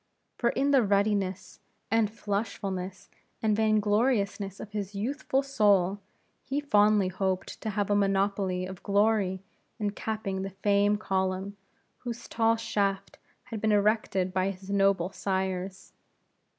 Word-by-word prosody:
For 235 - +1
in 280 +3 +1
the 275 -2 +6
ruddiness, 200 -2 0 0.3
and 225 -2 +3
flushfulness, 200 -3 -4 0.4
and 215 -1 +3
vain 215 0 +3
gloriousness 205 -2 0
of 215 - -8
his 205 -1 -4
youthful 265 +5 -1
soul, 205 -7 +3 0.4
he 275 +2 -2
fondly 210 -7 +3
hoped 185 0 -2
to 220 - -3
have 205 -1 -1
a - - +4
monopoly 195 -2 +1
of 185 -1 -8
glory 200 -2 +1 0.3
in 210 -3 -1
capping 210 -2 -3
the 195 - -3
fame 200 +2 +2
column, 190 0 -1 0.4
whose 240 -1 -6
tall 225 0 +2
shaft 200 -3 -2 0.2
had 225 -3 -7
been 220 - +2
erected 205 -3 +1
by 185 +1 +1
his 195 0 -7
noble 195 -2 +2
sires. 190 -1 -3
200 Hz, 135 wpm, -28 LUFS, 190-215 Hz, 0.4 s, the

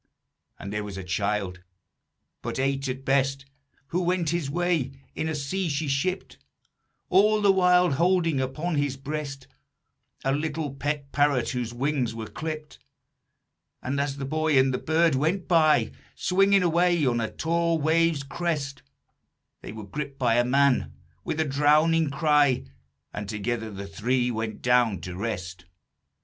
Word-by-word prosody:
"And 100 +1 -7
there 105 0 -2
was 100 -2 -7
a 95 - -5
child, 95 0 -2 0.8
but - - -4
eight 135 +1 0
at 130 +1 -5
best, 135 0 +1 0.4
Who 180 - 0
went 175 -3 0
his 170 -5 -1
way 165 -4 0 0.2
in 160 - -2
a 160 - -2
sea 165 +6 -2
she 145 +1 -2
shipped, 180 +8 -2 0.7
All 210 +3 +4
the 205 -1 +5
while 180 -2 +4
holding 165 -1 +2
upon 150 +5 -2
his 145 -2 0
breast 140 -1 -5 0.8
A 135 - +1
little 150 0 -2
pet 140 0 -3
parrot 145 -4 +2
whose 125 -2 -3
wings 125 -2 -1
were 110 -1 -5
clipped. 155 +4 -6 1.0
And, 140 +2 -1
as 140 -1 -2
the 135 - -4
boy 155 +1 +1
and 130 0 +4
the 125 - -1
bird 165 0 +2
went 160 +8 0
by, 160 -4 +4 0.2
Swinging 195 +1 +3
away 175 -2 +2
on 120 -2 +1
a 110 - -2
tall 170 0 0
wave's 160 -1 +2
crest, 145 -2 -3 0.8
They - - -8
were 110 -1 -8
gripped 140 +6 -6
by 120 -3 +2
a 120 - +4
man, 135 +1 +2 0.3
with 155 - -3
a 160 - +2
drowning 150 +3 +3
cry, 145 -3 +3 0.5
And 105 -1 -5
together 110 +2 -3
the 100 -1 -7
three 120 +5 0
went 110 -1 -4
down 120 -6 +3
to 90 -1 -6
rest. 90 -4 -5
140 Hz, 155 wpm, -26 LUFS, 125-160 Hz, 1.0 s, the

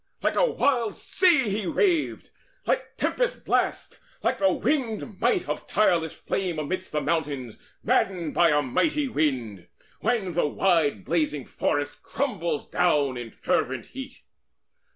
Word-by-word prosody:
Like - - +1
a - - +4
wild 245 - +1
sea 340 - +3
he 205 -1 -2
raved, 345 - +1 0.3
like - - -1
tempest - - -1
blast, - - 0 0.2
Like - - +1
the 290 - +4
winged 230 -8 -1
might 245 +10 +2
of - - -4
tireless 170 -6 +2
flame 180 -2 -2
amidst 185 +5 -3
The 150 - 0
mountains 140 -9 -2 0.2
maddened 195 -9 +1
by 170 -1 +5
a 150 -1 +3
mighty 295 - +1
wind, 125 - -1 0.3
When 205 -7 0
the 165 -2 +2
wide 150 - +1
blazing 150 -5 0
forest 145 0 -2
crumbles 195 - -2
down 145 -7 +2
In 120 -2 -6
fervent 125 +1 -1
heat. 265 +1 -9
175 Hz, 135 wpm, -26 LUFS, 145-245 Hz, 0.3 s, by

